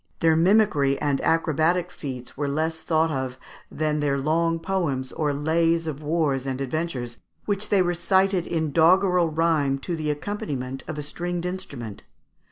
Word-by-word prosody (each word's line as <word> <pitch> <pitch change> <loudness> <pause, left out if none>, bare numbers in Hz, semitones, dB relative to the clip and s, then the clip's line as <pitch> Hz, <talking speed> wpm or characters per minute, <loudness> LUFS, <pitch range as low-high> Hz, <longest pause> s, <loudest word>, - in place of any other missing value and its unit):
Their 160 -1 +4
mimicry 165 -6 +3
and 145 -2 0
acrobatic 165 +2 +1
feats 130 -4 -7
were 145 +1 -2
less 160 +3 -1
thought 160 0 +1
of 130 -2 -3 0.3
than 150 -1 -1
their 145 -2 +1
long 165 +4 +1
poems 165 -7 -2
or 150 -2 -1
lays 165 +3 +1
of 155 -2 -4
wars 145 -4 0
and 130 -1 -2
adventures, 135 -3 -3 0.3
which 205 0 -1
they 195 -3 +4
recited 180 +1 +1
in 160 -3 -1
doggerel 180 +2 +4
rhyme 155 -4 +1
to 175 - -2
the 155 -2 -3
accompaniment 145 -6 -4
of 155 - -5
a 150 - -3
stringed 175 +3 -4
instrument. 140 - -6
160 Hz, 155 wpm, -25 LUFS, 140-170 Hz, 0.3 s, Their